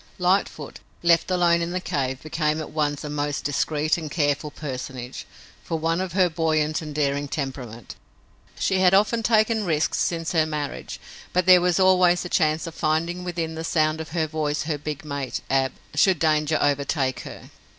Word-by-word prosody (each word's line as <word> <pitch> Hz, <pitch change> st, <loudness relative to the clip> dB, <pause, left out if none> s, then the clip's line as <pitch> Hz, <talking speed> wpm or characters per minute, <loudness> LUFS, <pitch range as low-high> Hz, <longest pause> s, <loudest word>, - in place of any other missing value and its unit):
Lightfoot, 180 Hz, -5 st, 0 dB, 0.2 s
left 170 Hz, +1 st, +4 dB
alone 175 Hz, -2 st, +3 dB
in 170 Hz, -, -2 dB
the 180 Hz, +1 st, -2 dB
cave, 135 Hz, -6 st, -3 dB
became 155 Hz, 0 st, -1 dB
at 155 Hz, -, -6 dB
once 150 Hz, -2 st, -1 dB
a -, -, -4 dB
most 145 Hz, 0 st, -2 dB
discreet 150 Hz, +2 st, 0 dB
and 155 Hz, -2 st, -6 dB
careful 145 Hz, -1 st, 0 dB
personage, 130 Hz, -3 st, -7 dB, 0.4 s
for 165 Hz, -, -2 dB
one 165 Hz, +2 st, 0 dB
of 185 Hz, -2 st, -4 dB
her 185 Hz, -1 st, +4 dB
buoyant 155 Hz, -2 st, 0 dB
and 150 Hz, -2 st, -7 dB
daring 145 Hz, -1 st, 0 dB
temperament. 130 Hz, -6 st, -5 dB, 0.6 s
She 190 Hz, -, +1 dB
had 185 Hz, 0 st, +5 dB
often 215 Hz, +3 st, +3 dB
taken 220 Hz, 0 st, +2 dB
risks 155 Hz, -6 st, 0 dB
since 165 Hz, -1 st, -1 dB
her 160 Hz, -2 st, +2 dB
marriage, 150 Hz, -2 st, -5 dB, 0.3 s
but 180 Hz, 0 st, +2 dB
there 185 Hz, -1 st, +7 dB
was 180 Hz, 0 st, +2 dB
always 180 Hz, -2 st, +4 dB
the 180 Hz, -, -6 dB
chance 155 Hz, -1 st, +1 dB
of 165 Hz, -, -7 dB
finding 165 Hz, +4 st, -1 dB
within 170 Hz, -2 st, -3 dB
the 160 Hz, 0 st, -5 dB
sound 155 Hz, -1 st, +1 dB
of 160 Hz, -, -8 dB
her 160 Hz, 0 st, 0 dB
voice 150 Hz, -1 st, -2 dB
her 150 Hz, -1 st, -2 dB
big 150 Hz, +1 st, -5 dB
mate, 140 Hz, -3 st, -4 dB
Ab, 135 Hz, -1 st, +2 dB, 0.2 s
should 180 Hz, +5 st, +4 dB
danger 155 Hz, 0 st, +2 dB
overtake 140 Hz, -2 st, 0 dB
her. -, -, -10 dB
155 Hz, 180 wpm, -24 LUFS, 145-175 Hz, 0.6 s, there